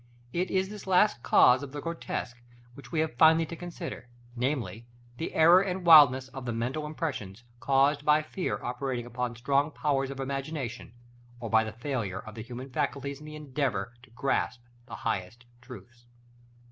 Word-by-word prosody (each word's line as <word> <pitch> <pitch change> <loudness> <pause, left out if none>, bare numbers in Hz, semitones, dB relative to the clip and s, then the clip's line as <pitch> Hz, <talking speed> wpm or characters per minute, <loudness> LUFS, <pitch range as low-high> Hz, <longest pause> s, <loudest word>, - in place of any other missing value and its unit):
It 180 +1 -1
is 190 0 0
this 210 -2 -9
last 185 - +3
cause 125 +2 +5
of 140 -1 -8
the 145 - -4
grotesque 140 -6 -5 0.3
which 125 -1 -13
we 155 - +1
have 160 -4 -2
finally 160 +2 +6
to 170 - -7
consider; 170 -6 -7 0.3
namely, 120 -3 -2 0.3
the 165 - -5
error 170 +3 +7
and 185 -2 -3
wildness 140 -6 +8
of 130 -1 -8
the - - -1
mental 125 +7 -3
impressions, 125 - -5 0.2
caused 140 +2 +2
by 150 +1 +4
fear 180 +4 -3
operating 125 -1 -3
upon 120 0 -4
strong 140 +5 +1
powers 140 -3 -1
of 135 0 -7
imagination, 135 -3 -4 0.5
or 115 -2 -6
by 110 0 +5
the 110 - -5
failure 115 -5 -4
of 110 - -11
the 110 - -7
human 125 +3 -8
faculties 140 +3 -2
in 150 - -11
the 155 - -8
endeavor 130 -8 -2
to 130 - -18
grasp 125 0 -1 0.3
the - - -7
highest 110 +2 -4 0.2
truths. 120 -1 -13
135 Hz, 170 wpm, -28 LUFS, 120-155 Hz, 0.5 s, wildness